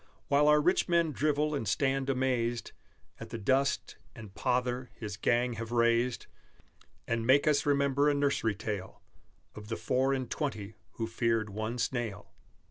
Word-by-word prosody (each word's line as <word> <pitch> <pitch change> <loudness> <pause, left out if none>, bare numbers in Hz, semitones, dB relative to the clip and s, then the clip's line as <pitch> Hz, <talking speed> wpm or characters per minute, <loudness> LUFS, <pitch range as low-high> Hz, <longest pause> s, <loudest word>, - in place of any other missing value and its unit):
While 145 +1 +4
our 150 0 +6
rich 180 +4 +2
men 170 -2 +3
drivel 150 +1 0
and 135 -7 -2
stand 135 +1 0
amazed 125 -3 0 0.5
At - - -8
the 115 - -5
dust 135 +6 0 0.2
and 110 -5 -11
pother 125 +1 -1
his 105 -3 -6
gang 120 +3 +1
have 115 0 -6
raised, 120 +1 +2 0.8
And 115 0 -1
make 130 +4 +4
us 150 -1 +2
remember 140 0 +3
a 145 - +2
nursery 140 -7 +1
tale 100 -2 -6 0.5
Of 105 0 -10
the 115 - -3
four 130 +2 +1
and 130 -2 -1
twenty 110 -8 -4 0.2
who 115 - -3
feared 115 -1 0
one 110 +4 -3
snail. 115 -5 -3
125 Hz, 155 wpm, -30 LUFS, 115-140 Hz, 0.8 s, our